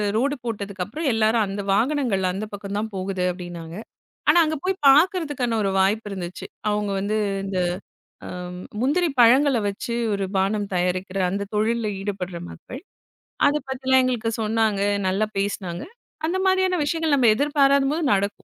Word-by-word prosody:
Road 280 +5 +1
போட்டதுக்கப்புறம், 210 - -4
எல்லாரும் 220 0 +3
அந்த 200 +1 -4
வாகனங்கள் 230 -6 +1
அந்தப் 210 +3 -5
பக்கம் 200 0 -6
தான் 220 +1 -3
போகுது 185 -1 -2
அப்படின்னாங்க. 175 -2 -8 0.5
ஆனா 345 - +6
அங்க 315 0 -1
போய்ப் 385 +1 -1
பாக்குறதுக்கான 290 -6 +3
ஒரு 195 - +1
வாய்ப்பு 210 +3 +1
இருந்துச்சு. 180 -2 -6 0.2
அவங்க 210 -1 -1
வந்து 205 +2 -1 0.3
இந்த 195 -1 -3 0.7
அம் 180 0 -7 0.2
முந்திரி 315 +7 +2
பழங்கள்ல 255 +2 +5
வச்சு 220 +4 -4 0.2
ஒரு 200 -1 -1
பானம் 200 +1 0
தயாரிக்கிற 180 +2 -1
அந்தத் 200 +2 -4
தொழில்ல 225 +1 +1
ஈடுபட்ற 190 -3 -4
மக்கள். 255 - -10 0.7
அதைப் 285 -1 +1
பத்தி 265 0 -5
எல்லாம் 260 0 +6
எங்களுக்கு 240 -3 0
சொன்னாங்க. 220 -2 +1 0.3
நல்லா 195 +3 +1
பேசுனாங்க. 190 -3 -3 0.4
அந்த 345 +3 -1
மாரியான 375 -1 +3
விஷயங்கள் 320 0 +1
நம்ம 245 -3 +4
எதிர்பாராத 280 0 +3
போது 325 +2 -1
நடக்கும். 200 +1 -2
215 Hz, 145 wpm, -23 LUFS, 195-275 Hz, 0.7 s, ஆனா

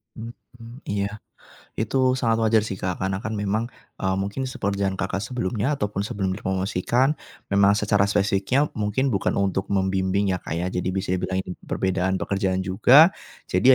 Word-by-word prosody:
Mhm, 115 +1 -11
iya. 100 +1 -2 0.6
Itu 130 +3 +1
sangat 115 -3 +1
wajar 110 -1 +3
sih, 95 -3 -5
Kak. 90 -1 -2
Karena 95 0 -1
kan 110 0 -4
memang, 105 +3 -1 0.3
eee, 95 -1 0
mungkin 100 +7 -2
se 130 - -8
pekerjaan 100 -1 -1
Kakak 95 +1 -2
sebelumnya 120 +3 -1
ataupun 105 -4 -2
sebelum 100 -2 -2
dipromosikan, 95 +7 0 0.4
memang 100 +1 +5
secara 100 -1 +2
spesifiknya 100 +8 +1
mungkin 110 +6 0
bukan 100 - 0
untuk 95 -1 0
membimbing 95 0 +1
ya, 90 - -2
Kak, 80 - -5
ya. 85 +2 -1
Jadi 90 0 -2
bisa 95 -1 -1
dibilang 95 +1 -1
ini - - -6
perbedaan 95 0 -1
pekerjaan 95 -1 -1
juga. 125 - +6 0.4
Jadi 95 +8 +3
100 Hz, 160 wpm, -24 LUFS, 95-115 Hz, 0.6 s, juga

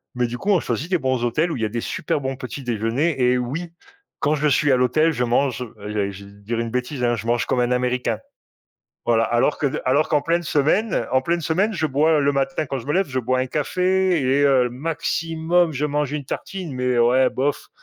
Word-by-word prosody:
mais 125 - +1
du 120 +1 -5
coup, 200 - -3
on 195 -4 +5
choisit 135 +8 -3
des 185 - +2
bons 130 -5 -1
hôtels 155 +8 +1
où - - -2
il 115 - -5
y 110 - +2
a - - -2
des 115 +2 -3
super 150 - -2
bons 135 -1 -3
petits 130 +1 -7
déjeuners. 120 +7 0
Eh, 125 0 +3
oui, 150 +8 -4 0.5
quand 145 - +1
je 150 0 +1
suis 145 0 +3
à - - +5
l'hôtel, 130 +6 +3
je 125 -5 -1
mange, 125 +1 +1 0.2
eh - - -13
allez, 105 -1 -2
je 100 +1 -11
vais 100 - -14
dire 115 +3 -3
une 115 -1 -3
bêtise, 125 +1 -3
hein, 120 0 +2
je 115 0 -6
mange 120 0 +1
comme 125 - 0
un 120 - +2
Américain. 125 -2 0 0.9
Voilà. 115 -1 +3
Alors 120 +6 +1
que 145 - 0 0.2
alors 140 +4 +2
qu'en 150 -3 +2
pleine 170 +2 +1
semaine 165 +9 +1
en 130 - +4
pleine 170 +4 0
semaine, 195 +8 +1
je 160 -3 0
bois 150 +3 +2
heu, 150 - +3
le 140 - +3
matin 135 +2 -1
quand 135 0 -3
je 120 - -9
me 145 - 0
lève, 190 +1 +2
je 130 -1 -2
bois 130 +1 0
un 130 - -1
café 180 +5 +1
et 135 +2 +2
heu, 130 -3 +3
maximum, 165 +3 0
je 145 +1 -2
mange 150 -1 -1
une 150 -2 -3
tartine 180 +4 -5
mais 125 -1 0
ouais, 125 +2 +4
bof 140 +2 -2
135 Hz, 240 wpm, -22 LUFS, 125-155 Hz, 0.9 s, on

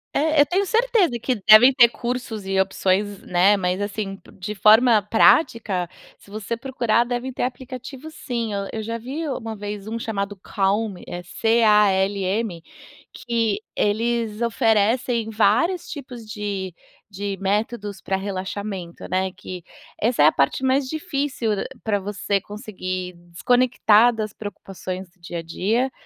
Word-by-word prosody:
É, 310 +1 +2
eu 290 - +5
tenho 375 +5 +1
certeza 445 - +2
que 245 -2 -2
devem 245 +5 +9
ter 240 -3 +7
cursos 235 -4 -4
e 195 0 0
opções, 195 +1 -1
né, 185 +3 +3
mas 185 +1 -1
assim, 205 -1 -4 0.2
de 200 +3 -5
forma 220 +3 +5
prática, 210 - +3 0.3
se - - -19
você 215 +2 -4
procurar, 240 -2 +1
devem 245 +1 -4
ter - - -5
aplicativos, 255 +3 -6
sim. 240 -8 -4
Eu 200 0 -3
eu 220 -1 -4
já 230 +1 -3
vi 285 +7 -5
uma 225 -4 -4
vez 205 0 -6
um 225 - -3
chamado 205 -3 -3
Calm, 200 +1 -1
é 175 0 -6
C 225 +6 +1
A 210 -2 +6
L 195 +1 0
M, 190 -3 -2 0.5
que 230 -4 -1 0.2
eles 225 +1 0
oferecem 225 +1 +1
vários 230 - +2
tipos 255 -6 -8
de 200 -4 -4 0.3
de 200 0 -4
métodos 205 0 -2
para 190 - -1
relaxamento, 190 -2 -5
né, 185 +1 0
que 180 -1 -9 0.4
essa 230 -8 +3
é - - +7
a - - +6
parte 140 - 0
mais 265 +1 +2
difícil 275 -7 -2
d - - -2 0.2
pra 205 -2 0
você 200 0 -1
conseguir 185 -4 -6 0.2
desconectar 245 +1 +4
das 215 -2 -4
preocupações 190 -3 -7
do 180 - -34
dia 170 0 -7
a - - -4
dia 225 +10 -1
215 Hz, 150 wpm, -22 LUFS, 195-240 Hz, 0.5 s, devem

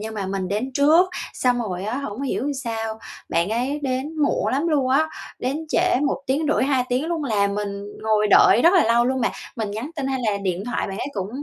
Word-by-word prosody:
nhưng 220 +1 -6
mà 200 -2 -3
mình 190 -1 -3
đến 215 +7 -2
trước. 315 +6 +5 0.2
Xong 250 -1 +1
rồi 185 -2 -4
á 220 +4 -2
hổng 265 -2 -5
hiểu 275 +1 -1
sao, 225 -1 -3 0.3
bạn 170 +3 +1
ấy 255 +6 -1
đến 270 +4 -2
muộn 285 - +1
lắm 290 +6 +1
luôn 280 -5 +1
á, 295 +5 +3 0.3
đến 285 +6 -2
trễ 360 +3 +2
1 - - -2
tiếng 285 +4 0
rưỡi - - +2
2 265 -2 +1
tiếng 255 +5 0
luôn 330 -3 -2
là 210 -6 +2
mình 205 0 -2 0.3
ngồi 215 -1 +2
đợi 240 - +6
rất 340 - +6
là 360 - +5
lâu 235 +1 +3
luôn 260 +1 0
mà. - - +1 0.3
Mình 215 -3 -3
nhắn 225 +9 -5
tin 275 -2 -2
hay 265 -1 -1
là 200 - -1
điện 190 -1 -2
thoại 245 - -2
bạn 195 +2 -5
ấy - - -3
cũng 195 -1 -3
250 Hz, 235 wpm, -22 LUFS, 210-280 Hz, 0.3 s, đợi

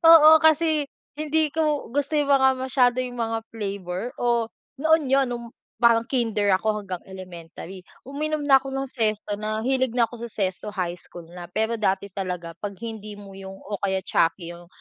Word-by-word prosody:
Oo, 315 0 +9
kasi 315 -2 +4 0.3
hindi 310 0 +1
ko 305 -5 0
gusto 290 +2 0
'yung 290 -1 +1
mga 265 -1 +6
masyado 255 -1 +2
'yung 245 -1 -6
mga 225 -1 -1
flavor, 200 0 -4
o 235 -2 +1 0.3
noon 320 0 +4
'yun 270 -1 +4
no'ng 235 -1 -5 0.4
parang 230 -1 +5
Kinder 220 -6 +2
ako 210 +2 0
hanggang 185 -4 -6
elementary, 185 0 -9 0.2
uminom 305 +3 -2
na 270 -2 +6
ako 270 - -6
ng 270 0 -2
Zesto, 215 -4 -1
na 215 +1 -3
hilig 260 -2 +2
na 235 -1 +2
ako 235 - -13
sa - - -10
Zesto 195 0 -2
high 180 -3 -2
school 175 -1 -12
na, 175 0 -10
pero 220 +1 0
dati 200 -2 0
talaga 180 -3 -4
pag 205 - -4
hindi 220 -2 -7
Moo 195 -1 -11
'yung 195 0 -9
o 205 0 -5
kaya 190 -1 +1
Chuckie 170 +1 0
'yung 175 0 -14
225 Hz, 180 wpm, -24 LUFS, 195-270 Hz, 0.4 s, Oo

